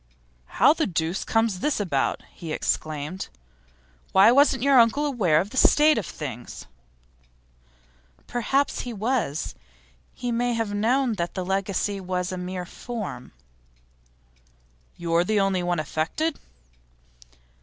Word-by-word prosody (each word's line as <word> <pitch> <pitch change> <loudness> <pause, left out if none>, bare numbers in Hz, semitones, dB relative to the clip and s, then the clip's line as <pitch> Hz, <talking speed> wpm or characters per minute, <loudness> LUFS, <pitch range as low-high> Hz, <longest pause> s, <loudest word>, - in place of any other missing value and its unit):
'How 295 - +4
the 320 - -1
deuce 170 0 -1
comes 225 -4 +1
this 295 +4 0
about?' 155 -10 -1
he 165 -2 -8
exclaimed. 155 +3 -2 0.9
'Why, 195 +4 +7
wasn't 270 -1 +4
your 275 -2 +6
uncle 235 +6 +3
aware 200 - +2
of 195 +5 -3
the 260 - -7
state 300 0 +5
of 210 - -6
things?' 130 -6 -7 1.6
'Perhaps 270 +4 0
he 245 - -5
was. 215 - -1 0.6
He 245 - -3
may 240 +1 0
have 225 -3 -2
known 240 +4 +1
that 170 - -4
the 185 -2 -3
legacy 195 +1 -1
was 180 -1 -3
a 185 - -4
mere 180 0 -5
form.' 205 - -7 1.7
'You 170 -1 -3
are 170 +1 +4
the 210 +3 +1
only 195 -2 +1
one 175 -1 -1
affected? 160 - -2
200 Hz, 130 wpm, -25 LUFS, 175-245 Hz, 1.7 s, Why